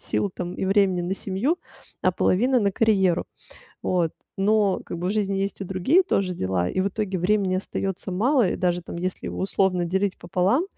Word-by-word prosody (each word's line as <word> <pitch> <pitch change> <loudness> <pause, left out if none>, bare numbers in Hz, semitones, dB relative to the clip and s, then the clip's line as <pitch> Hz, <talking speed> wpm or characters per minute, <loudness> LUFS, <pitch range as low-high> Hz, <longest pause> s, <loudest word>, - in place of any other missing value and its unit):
сил 200 - -1
там 180 0 -4
и - - -3
времени- 195 -2 +3
на 185 +2 -1
семью, 215 - -1 0.4
а - - +3
половина- 250 +6 +2
на 200 -1 +1
карьеру, 190 -6 +2 0.6
вот. 175 -3 +1 0.2
Но 205 0 +2
как 170 - -6
бы 180 - -2
в - - 0
жизни 200 -2 0
есть 195 +1 -2
и - - -3
другие 195 - +3
тоже 195 - 0
дела, 95 - -1
и 185 - -1
в 195 - +1
итоге 195 -2 -2
времени 190 +1 +1
остаётся 190 0 -3
мало. 235 +2 +3
И - - -2
даже 175 -1 0
там 170 - -8
если 185 +2 -4
условно 190 -2 0
делить 190 +3 0
пополам, 185 - +1
190 Hz, 190 wpm, -24 LUFS, 180-205 Hz, 0.6 s, времени